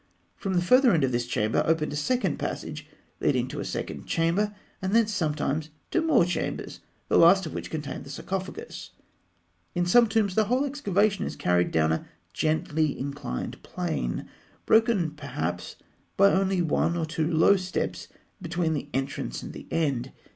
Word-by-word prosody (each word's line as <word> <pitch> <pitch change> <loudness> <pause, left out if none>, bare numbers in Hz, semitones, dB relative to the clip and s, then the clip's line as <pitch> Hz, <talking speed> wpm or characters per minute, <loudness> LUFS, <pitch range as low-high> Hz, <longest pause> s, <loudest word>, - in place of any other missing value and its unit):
From 190 -1 -3
the 175 - +2
further 250 +3 +5
end 160 -4 +3
of 130 - +2
this 120 0 -1
chamber 110 -2 +1
opened 155 -2 +1
a - - -3
second 245 +13 0
passage - - -5 0.3
leading - - +1
to - - -5
a - - -2
second - - -5
chamber, 185 +6 +1 0.3
and 190 +3 0
thence 225 -2 +3
sometimes 155 -4 -1 0.2
to 340 - +2
more 315 - +4
chambers, 175 -2 -3 0.3
the - - +4
last 190 +3 +6
of - - -6
which - - -5
contained 150 -2 -5
the 135 - -12
sarcophagus. 195 - -6 0.8
In 175 0 +1
some 235 +6 +6
tombs, 215 -3 +1
the 220 +2 +3
whole 250 +6 +1
excavation 210 -8 +1
is - - -5
carried 90 0 +2
down 80 -1 +2
a 80 - -2 0.3
gently 155 -1 0
inclined 140 - -5
plane, - - -3 0.4
broken 220 -8 +3
perhaps 90 - -4 0.4
by 200 +1 +6
only 190 -1 +2
one 170 +1 +1
or 165 - 0
two 160 +1 -1
low 165 +5 +5
steps 185 -1 -3 0.3
between 170 -1 -1
the 145 -1 -4
entrance 135 - -3
and - - -7
the - - -10
end. 135 -6 -1
170 Hz, 170 wpm, -27 LUFS, 145-200 Hz, 0.8 s, last